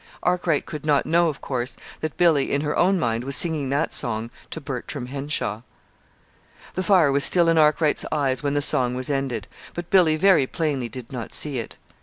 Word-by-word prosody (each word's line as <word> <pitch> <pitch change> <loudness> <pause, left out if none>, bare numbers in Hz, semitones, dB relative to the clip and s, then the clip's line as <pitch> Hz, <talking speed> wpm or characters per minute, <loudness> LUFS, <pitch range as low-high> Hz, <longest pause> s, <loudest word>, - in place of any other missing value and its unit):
Arkwright 175 -4 +1
could 150 -2 -7
not 150 -2 +2
know, 170 +1 +3
of 145 - -7
course, 125 -2 -3 0.2
that 155 -1 -5
Billy, 160 -6 +3
in 140 - +1
her 150 0 -2
own 190 +2 +3
mind, 115 -5 -1
was 140 +1 -3
singing 155 -5 +1
that 145 +4 -1
song 115 0 -1 0.2
to - - -6
Bertram 135 -2 -6
Henshaw. 135 -5 -3 1.1
The 185 - -2
fire 185 -7 +4
was 140 +1 +1
still 175 -2 +3
in 165 -1 +3
Arkwright's 150 0 +2
eyes 135 -4 0
when 145 0 -1
the 145 - +2
song 125 -3 +4
was 130 +3 -3
ended; 135 -6 -2 0.3
but 175 0 -6
Billy 175 -5 +5
very 165 -5 +4
plainly 140 -7 -2
did 120 +1 -9
not 125 -4 -6
see 145 -4 0
it. 115 - -8
145 Hz, 195 wpm, -23 LUFS, 130-160 Hz, 1.1 s, Billy